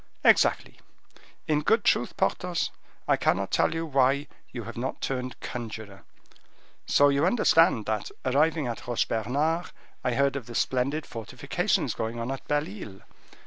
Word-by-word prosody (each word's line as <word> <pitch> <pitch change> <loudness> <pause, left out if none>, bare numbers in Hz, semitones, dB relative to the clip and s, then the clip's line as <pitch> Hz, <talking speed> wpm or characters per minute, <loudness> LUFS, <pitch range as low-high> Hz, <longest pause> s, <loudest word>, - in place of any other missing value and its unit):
'" - - -40
"Exactly. - - +3 0.7
In 150 -1 +2
good 220 +7 +3
truth, 120 - +1
Porthos, 180 -2 0 0.4
I - - +4
cannot - - +1
tell - - +3 0.2
why 140 -1 +2 0.2
you 120 - -6
have - - -8
not 125 +3 -3
turned 130 -1 -3
conjuror. 110 -5 -7 0.9
So 145 0 +5
you 140 +1 +2
understand 165 - +4
that, 110 -1 -2 0.2
arriving 150 +3 +2
at 120 -1 -5
Roche 120 -1 +1
Bernard, 145 +10 0 0.4
I 125 - 0
heard 140 +1 +2
of 130 -5 -5
the 120 - -8
splendid 135 +7 0
fortifications 115 -2 -1
going 115 +1 -4
on 115 +3 -3
at 135 - -6
Belle 145 0 +1
Isle. 100 -1 -9
130 Hz, 150 wpm, -27 LUFS, 115-150 Hz, 0.9 s, So